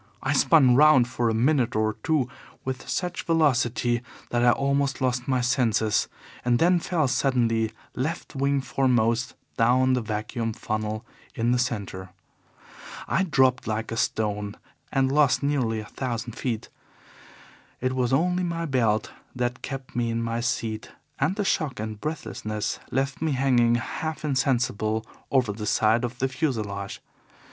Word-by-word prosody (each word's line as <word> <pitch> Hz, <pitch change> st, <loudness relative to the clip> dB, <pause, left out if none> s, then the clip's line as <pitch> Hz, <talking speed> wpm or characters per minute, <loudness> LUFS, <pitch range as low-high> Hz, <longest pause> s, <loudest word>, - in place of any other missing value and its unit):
I 135 Hz, -, +1 dB
spun 140 Hz, -3 st, +5 dB
round 145 Hz, -3 st, +6 dB
for 120 Hz, -2 st, 0 dB
a -, -, +1 dB
minute 125 Hz, 0 st, +2 dB
or 110 Hz, 0 st, +1 dB
two 150 Hz, -3 st, +1 dB, 0.4 s
with 130 Hz, 0 st, -4 dB
such 180 Hz, -1 st, -2 dB
velocity 125 Hz, -7 st, +2 dB, 0.3 s
that 120 Hz, 0 st, +1 dB
I 120 Hz, -, +6 dB
almost 140 Hz, +2 st, +1 dB
lost 125 Hz, -2 st, 0 dB
my 130 Hz, -2 st, +2 dB
senses, 120 Hz, -4 st, +2 dB, 0.4 s
and 120 Hz, -1 st, +3 dB
then 175 Hz, +5 st, +4 dB
fell 165 Hz, -4 st, 0 dB
suddenly, 115 Hz, -4 st, +1 dB, 0.2 s
left 150 Hz, +3 st, -4 dB
wing 140 Hz, 0 st, +1 dB
foremost, 120 Hz, -2 st, +1 dB, 0.2 s
down 130 Hz, +2 st, +4 dB
the 125 Hz, -, +1 dB
vacuum 110 Hz, +1 st, -3 dB
funnel 110 Hz, +1 st, -3 dB, 0.3 s
in 115 Hz, +1 st, +1 dB
the 125 Hz, -, +2 dB
centre. 100 Hz, -6 st, -3 dB, 1.0 s
I -, -, +1 dB
dropped 130 Hz, -, +2 dB
like 110 Hz, +1 st, -2 dB
a -, -, -2 dB
stone, 105 Hz, -2 st, -1 dB, 0.3 s
and 135 Hz, 0 st, +2 dB
lost 145 Hz, -1 st, +3 dB
nearly 125 Hz, -6 st, 0 dB
a -, -, -9 dB
thousand 120 Hz, -3 st, -3 dB
feet. 115 Hz, -3 st, -3 dB, 1.1 s
It 130 Hz, +1 st, -1 dB
was 125 Hz, -2 st, 0 dB
only 180 Hz, +6 st, +2 dB
my 170 Hz, -1 st, -2 dB
belt 115 Hz, -7 st, +1 dB, 0.2 s
that 125 Hz, 0 st, -2 dB
kept 135 Hz, -2 st, -7 dB
me 120 Hz, -1 st, 0 dB
in 115 Hz, 0 st, -1 dB
my 115 Hz, 0 st, -2 dB
seat, 115 Hz, -2 st, -2 dB, 0.3 s
and 155 Hz, +8 st, +1 dB
the 205 Hz, -1 st, -1 dB
shock 155 Hz, -, 0 dB
and 110 Hz, -1 st, -5 dB
breathlessness 110 Hz, -8 st, -3 dB
left 135 Hz, +2 st, -1 dB
me 160 Hz, -2 st, +1 dB
hanging 125 Hz, -3 st, +3 dB
half 155 Hz, +6 st, -3 dB
insensible 120 Hz, -6 st, 0 dB, 0.2 s
over 125 Hz, -6 st, +2 dB
the 105 Hz, 0 st, -5 dB
side 110 Hz, +3 st, +3 dB
of 120 Hz, 0 st, -3 dB
the 135 Hz, -, +1 dB
fuselage. 110 Hz, -9 st, -3 dB
125 Hz, 150 wpm, -25 LUFS, 115-135 Hz, 1.1 s, round